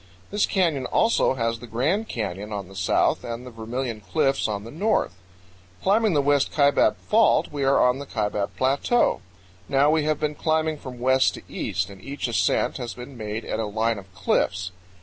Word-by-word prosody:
This 205 0 +2
canyon 165 -9 +1
also 225 - +2
has 115 -2 -1
the 120 - -10
Grand 155 - 0
Canyon 105 -2 -4
on 100 -3 -4
the 95 - -14
south 95 - +1
and 120 +1 -6
the 125 - -9
Vermilion 115 0 -4
Cliffs 135 +5 +1
on 105 -2 -3
the 115 - -9
north. 205 - 0 0.7
Climbing 210 0 +3
the 145 - +3
West 145 -1 +2
Kaibab 140 -2 +3
Fault, 220 0 +3
we 145 -2 -3
are 135 +1 +4
on 125 +1 +3
the 140 - -7
Kaibab 105 -3 -1
Plateau. 140 - +2 0.5
Now 140 +2 +4
we 160 0 +3
have 155 -1 0
been 150 0 -1
climbing 155 0 0
from 130 -3 -8
west 130 +2 +3
to - - -10
east, 95 +1 -3
and 95 -1 -13
each 140 +4 -4
ascent 120 - +1
has 120 - -5
been 125 +2 -9
made 110 -1 -5
at - - -3
a 110 - -1
line 110 +1 0
of 95 0 -15
cliffs. 90 -2 0
125 Hz, 190 wpm, -24 LUFS, 110-150 Hz, 0.7 s, are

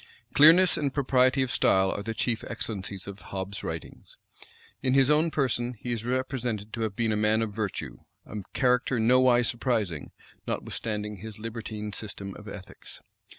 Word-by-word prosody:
Clearness 165 +5 +7
and 140 -2 0
propriety 130 -1 +3
of 130 - -2
style 95 0 +3
are - - -3
the 110 +2 -4
chief 115 -1 0
excellencies 100 -4 -4
of 100 0 -8
Hobbes's 95 +1 -5
writings. - - -7 0.6
In 130 0 +2
his 135 +1 +5
own 155 +2 +4
person, 125 -4 0
he 120 - -5
is 115 -2 -2
represented 125 -4 -2
to 115 - -3
have 110 -3 -1
been 115 0 +1
a - - +1
man 105 +1 +2
of 105 -2 -4
virtue; 105 -2 -4 0.3
a 105 - -7 0.2
character 125 -1 +2
nowise 120 +1 +5
surprising, 110 - -1 0.4
notwithstanding 105 -2 -3
his 110 +3 -8
libertine 110 -1 -5
system 100 -2 -6
of 105 - -11
ethics. 100 -2 -10
115 Hz, 160 wpm, -28 LUFS, 105-130 Hz, 0.6 s, Clearness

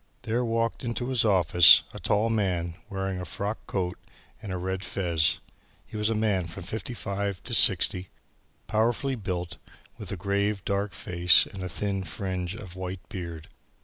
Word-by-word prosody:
There 115 +3 0
walked 115 +1 -1
into 120 +1 -3
his 130 -3 +2
office, 90 -5 +7
a - - -8
tall 110 +2 +1
man 90 -6 0 0.2
wearing 95 -2 -3
a - - -4
frock 100 +5 -3
coat 90 -2 -2 0.4
and 100 - -6
a 90 - -2
red 95 +1 -3
fez. 85 -4 +1 0.5
He - - -12
was 105 0 +1
a 115 - 0
man 105 -5 +1
from 85 +2 -8
fifty 110 +6 -5
five 100 -2 -3
to - - -5
sixty, 90 0 +3 0.6
powerfully 120 +5 +1
built, 90 -6 -4 0.4
with - - -6
a 100 - -3
grave 100 +2 -1
dark 100 -1 -1
face 90 +2 +5
and 95 - -9
a 90 - -4
thin 95 +3 -2
fringe 90 +2 -4
of 95 -6 -9
white 95 0 -6
beard. 85 -4 -7
95 Hz, 170 wpm, -27 LUFS, 90-105 Hz, 0.6 s, office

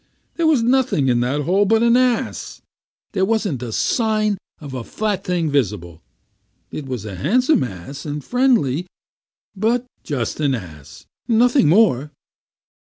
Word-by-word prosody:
There 335 -1 +1
was 290 -7 +3
nothing 245 - +2
in 120 -1 +2
that 130 +5 0
hole 185 +7 +2
but 225 +3 +3
an 235 0 +4
ass. 250 -2 0 0.5
There 190 -2 0
wasn't 200 - 0
a 120 -2 -5
sign 215 - 0 0.2
of 145 -3 -9
a 125 -2 -4
flat 210 - -2
thing 170 -4 -1
visible. 95 - -2 0.7
It 145 - -6
was 125 -5 -5
a 105 - -6
handsome 250 - +2
ass, 125 +6 -7
and 145 -1 -5
friendly, 225 - +1 0.7
but 230 +5 0 0.2
just 130 -5 -3
an 140 -3 +1
ass, 80 - -11 0.2
and 230 - +2
nothing 245 - +4
more." 155 - +3
175 Hz, 150 wpm, -20 LUFS, -, 0.7 s, an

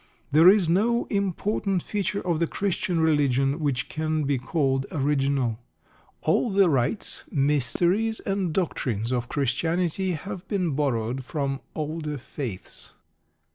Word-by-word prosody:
There 160 +5 +8
is 195 -3 +4
no 225 +8 +2
important 200 -1 0
feature 200 -1 -2
of 170 -3 0
the 170 - +1
Christian 180 -3 -1
religion 140 -2 +2
which 140 -5 -1
can 155 0 -1
be 140 -2 0
called 135 -1 0
original. 135 -5 0 0.6
All 245 - +2
the 195 -4 +4
rites, 135 - -1
mysteries, 170 - +1
and 195 -4 -1
doctrines 125 - -1
of 125 -1 -1
Christianity 165 +7 0
have 180 +3 -6
been 185 -5 0
borrowed 130 -3 -1
from 135 0 -2 0.2
older 155 -1 -3
faiths. 120 -6 -7
155 Hz, 125 wpm, -25 LUFS, 135-185 Hz, 0.6 s, There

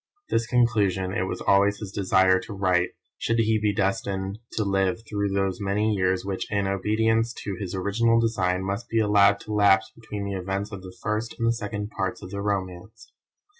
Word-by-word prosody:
This 115 0 +1
conclusion 105 -7 +2
it 95 -1 -1
was - - -4
always 100 +1 +3
his 105 -3 -7
desire 95 -1 +3
to 100 +3 -8
write 90 -2 +1 0.3
should 115 - 0
he 110 -1 +2
be 105 -1 +1
destined 100 -1 -2
to 110 - 0
live 100 +3 0
through 100 -1 -1
those 95 0 -1
many 105 +2 +1
years 95 -1 0
which, 95 -1 -4
in 100 -1 +1
obedience 110 +4 +1
to 100 - -3
his 95 -2 -4
original 115 +5 +2
design, 95 -5 0
must 100 +5 -4
be 115 - -1
allowed 100 -2 +4
to 105 - -6
lapse 100 0 +4
between 105 -3 -7
the 100 - -3
events 95 +2 -3
of 100 -2 -7
the 90 0 -11
first 110 +2 -2
and 115 0 +2
second 105 -1 -5
parts 95 -1 -3
of 90 - -9
the 100 0 -4
romance. 100 +2 -4
100 Hz, 190 wpm, -25 LUFS, 95-110 Hz, 0.3 s, allowed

